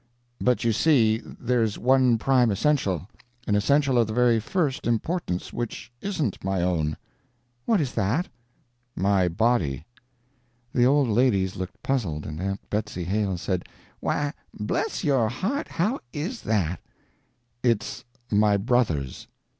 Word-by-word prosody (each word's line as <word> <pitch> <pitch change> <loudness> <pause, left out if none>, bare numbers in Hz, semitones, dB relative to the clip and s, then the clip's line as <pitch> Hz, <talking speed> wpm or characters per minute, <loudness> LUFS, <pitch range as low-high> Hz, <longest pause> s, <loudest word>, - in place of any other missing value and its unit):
"But, 125 -1 +2
you 115 -1 +2
see, 115 -5 +4
there's 120 -3 -1
one 130 -1 +4
prime 125 0 +3
essential 100 - +1 0.4
an 105 - 0
essential 135 +4 +3
of 115 - +3
the 110 - -4
very 120 -1 +4
first 150 - -1
importance 120 - -1
which 120 0 -5
isn't 160 - -2
my 95 -2 0
own." 80 -4 0 0.7
"What 220 - +3
is 140 -6 -1
that?" 120 - 0 0.7
"My 95 -1 +2
body." 85 - +1 0.9
The 125 0 +4
old 140 0 +4
ladies 105 -5 +2
looked 95 0 -7
puzzled, 95 - -1
and 75 +2 -5
Aunt 95 +1 -3
Betsy 105 -4 -2
Hale 95 +1 0
said: 90 0 -2 0.3
"Why 145 0 -1 0.3
bless 435 - -1
your 135 -8 +2
heart, 210 - -2
how 210 +10 0
is 180 - -4
that?" 90 -6 0 0.8
"It's 115 -4 0 0.3
my 105 -1 +4
brother's." 100 - 0
115 Hz, 130 wpm, -25 LUFS, 95-135 Hz, 0.9 s, see